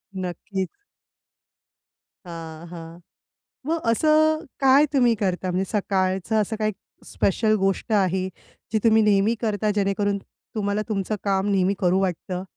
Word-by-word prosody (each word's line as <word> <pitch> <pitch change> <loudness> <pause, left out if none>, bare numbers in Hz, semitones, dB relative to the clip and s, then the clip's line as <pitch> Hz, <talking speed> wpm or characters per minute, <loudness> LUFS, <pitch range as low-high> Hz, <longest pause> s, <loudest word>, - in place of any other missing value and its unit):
नक्की. 185 +1 -4 1.6
हां, 165 -1 -8
हां. 165 0 -10 0.7
मग 330 +1 0
असं, 310 +4 +3
काय 275 +2 +6
तुम्ही 245 -4 +4
करता? 185 -2 -1
म्हणजे 185 +2 0
सकाळचं 195 +1 0
असं 220 +2 -2
काही 215 0 +1 0.3
स्पेशल 215 +3 +1
गोष्ट 195 +3 -1
आहे, 190 -2 +1 0.4
जी 220 - +2
तुम्ही 220 -1 +5
नेहमी 210 +2 +3
करता 215 -1 0
जेणेकरून 200 0 +1 0.4
तुम्हाला 205 0 0
तुमचं 205 0 -1
काम 195 0 +1
नेहमी 195 0 +2
करू 185 +1 +2
वाटतं? 180 0 -3
200 Hz, 125 wpm, -24 LUFS, 185-220 Hz, 1.6 s, काय